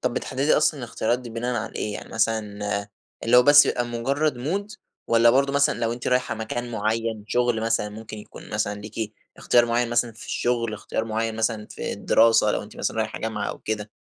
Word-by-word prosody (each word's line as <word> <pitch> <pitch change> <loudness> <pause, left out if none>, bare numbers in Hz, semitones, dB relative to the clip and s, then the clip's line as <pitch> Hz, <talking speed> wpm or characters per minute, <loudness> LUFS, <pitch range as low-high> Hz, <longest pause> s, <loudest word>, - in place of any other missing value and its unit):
طَب - - -1
بتحدِّدي 135 +3 +1
أصلًا 150 -1 +2
الاختيارات 120 0 -1
دي 125 -2 -9
بناءً 120 +2 -2
على - - -8
إيه؟ 105 - -2
يعني - - -7
مثلًا 105 -2 -1 0.4
اللي 120 +2 +5
هو 125 - +8
بس 145 +3 +8
بيبقى 120 - 0
مجرد 135 +5 0
مود 195 +11 -3 0.3
والَّا 115 0 +5
برضه 140 +3 +2
مثلًا 140 0 +2
لو 115 0 0
أنتِ 120 +1 -6
رايحة 125 -1 +1
مكان 120 +2 -4
معيّن، 110 0 -2
شغل 120 -2 +1
مثلًا 115 -2 0
ممكن 110 +1 -9
يكون 105 - -12
مثلًا 105 -1 -2
ليكِ 110 +1 -5 0.2
اختيار 120 -1 +3
معيّن 120 0 0
مثلًا 120 0 +1
في 110 - -12
الشغل، 115 -2 -1
اختيار 110 +1 -3
معيّن 115 0 -2
مثلًا 110 -1 -1
في - - -4
الدراسة 115 -2 +4
لو - - -1
أنتِ - - -13
مثلًا - - -2
رايحة 110 0 -2
جامعة 110 -2 -3
أو - - -6
كده؟ 105 -1 -4
115 Hz, 200 wpm, -24 LUFS, 110-120 Hz, 0.4 s, هو